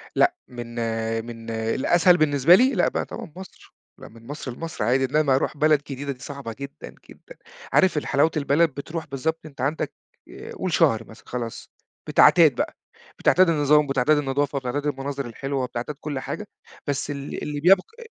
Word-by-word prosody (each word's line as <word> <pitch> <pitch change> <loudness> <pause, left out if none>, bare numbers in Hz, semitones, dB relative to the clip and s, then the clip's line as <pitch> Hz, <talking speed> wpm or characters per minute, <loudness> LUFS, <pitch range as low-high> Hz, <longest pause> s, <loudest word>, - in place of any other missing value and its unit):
لأ، 355 0 +3
من 120 -2 -8 0.5
من 115 -1 -9
الأسهل 130 +11 +3
بالنسبة 150 +1 +5
لي، 255 +7 +4
لأ - - +2
بقى - - -2
طبعًا - - -8
مصر، 190 +1 -13 0.2
لأ، - - -11
من 115 0 -16
مصر 145 -2 -6
لمصر 165 +1 -5
عادي 130 +4 +2
إنّما 140 0 +2
أرُوح 135 - -1
بلد 150 -1 +3
جديدة 140 +1 -4
دي 130 - -9
صعبة 135 -5 -7
جدًا، 140 0 -9
جدًا - - -15 0.4
عارف 190 -5 +4
الحلاوة 145 +2 +2
البلد 150 +3 +3
بتروح 160 +4 -6
بالضبط 150 +4 -2
أنت 140 -4 -10
عندك 145 +4 -1 0.4
آآ، - - -10
قُل 185 - -4
شهر 115 -7 +3
مثلًا، 110 - -15
خلاص، 120 -2 -6 0.4
بتعتاد - - +6
بقى، - - -2 0.4
بتعتاد 185 0 +4
النظام، 150 -1 +4
وبتعتاد 140 +2 +2
النضافة، 140 0 -1
بتعتاد 135 +3 -3
المناظر 140 -1 -3
الحلوة، 135 +3 -3
وبتعتاد 125 +3 -4
كل 145 -3 -4
حاجة، 205 +10 -6 0.4
بس 140 0 -2
ال 140 0 -6
اللي 150 -1 -4
بيبقى 195 - +2
140 Hz, 170 wpm, -24 LUFS, 130-155 Hz, 0.5 s, بتعتاد